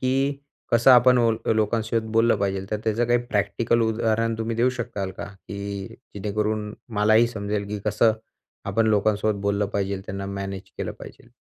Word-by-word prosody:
की 135 +2 0 0.3
कसं 120 +3 +6
आपण 125 0 +7
ओल 115 -2 +3
अ, - - +3
लोकांसोबत 110 +1 0
बोललं 115 +1 +4
पाहिजे. 95 -1 -1
तर 105 - 0
त्याचं 115 +2 +1
काही 120 0 +3
प्रॅक्टिकल 115 +2 +1
उदाहरण 115 0 +1
तुम्ही 115 0 -2
देऊ 120 +2 +3
शकाल 105 -5 -3
का, - - -5
की 100 0 -7 0.3
जेणेकरून 105 +1 -2 0.3
मलाही 110 +3 +5
समजेल, 105 -2 -3
की 105 0 -3
कसं 105 +2 +3 0.6
आपण 115 0 +2
लोकांसोबत 105 -1 +1
बोललं 100 0 +1
पाहिजे?. 100 -1 -1
त्यांना 100 +1 -5
मॅनेज 100 -1 -5 0.2
केलं - - -3
पाहिजे - - -12
110 Hz, 165 wpm, -24 LUFS, 100-115 Hz, 0.6 s, आपण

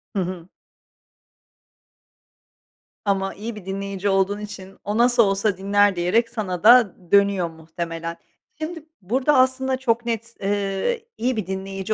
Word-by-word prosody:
Hı 195 - +1
hı. 180 -1 -5 2.6
Ama 195 -1 0
iyi 220 +3 -6
bir 205 - -10
dinleyici 195 0 -3
olduğun 195 +1 +1
için 195 -2 -9
o 205 +2 -2
nasıl 240 -1 +5
olsa 195 0 +1
dinler 200 0 +3
diyerek 200 +7 +1
sana 195 -6 -4
da 235 -3 +7
d 175 -2 -22
dönüyor, 200 -4 +4
muhtemelen. 165 +1 -6 0.4
Şimdi, 315 0 -5 0.2
burada, 260 +9 +2
aslında, 260 0 +2
çok 240 -2 0
net, 230 0 -3
eee, 200 - -1
iyi 250 +1 0
bir 195 -4 -3
dinleyici 195 +2 -3
200 Hz, 135 wpm, -23 LUFS, 190-235 Hz, 2.6 s, da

